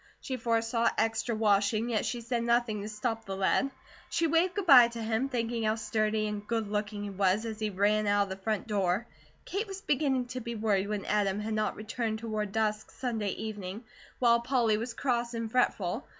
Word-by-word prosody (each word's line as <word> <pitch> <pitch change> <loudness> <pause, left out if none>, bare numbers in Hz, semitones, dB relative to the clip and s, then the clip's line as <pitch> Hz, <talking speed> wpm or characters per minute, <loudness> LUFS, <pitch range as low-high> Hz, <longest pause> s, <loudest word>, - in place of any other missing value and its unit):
She 265 - -4
foresaw 230 0 +1
extra 225 +1 0
washing, 215 +2 +2
yet 215 - 0
she 240 - -3
said 235 0 -1
nothing 235 -3 +1
to 210 - -5
stop 225 +1 -3
the 195 - -4
lad. 195 +8 +2 0.4
She 340 -1 +1
waved 335 +3 +2
good 405 -3 -2
bye 255 -7 +9
to 235 0 -7
him, 225 +4 0
thinking 235 -2 -1
how 215 0 +2
sturdy 215 0 0
and 210 -1 -4
good 225 -2 -1
looking 205 0 -3
he 205 - -4
was, 195 +3 +1
as 220 -1 -5
he 215 -1 -1
ran 205 +2 +2
out 205 0 +4
of 200 - -7
the 190 0 -7
front 215 -1 -1
door. 200 0 0 0.4
Kate 410 +4 -2
was 390 0 -7
beginning 270 -6 +1
to 255 0 -4
be 235 -1 -5
worried 205 -3 +1
when 210 -2 -3
Adam 205 -1 +1
had 215 +1 -3
not 215 0 0
returned 220 +1 -3
toward 215 -2 -3
dusk 215 0 -1
Sunday 225 -5 -2
evening, 210 -1 -6 0.4
and 235 -1 +4
Polly 235 -4 +2
was 230 +2 -4
cross 240 -2 -1
and 230 -1 -3
fretful. 220 -3 +1
220 Hz, 205 wpm, -30 LUFS, 210-235 Hz, 0.4 s, bye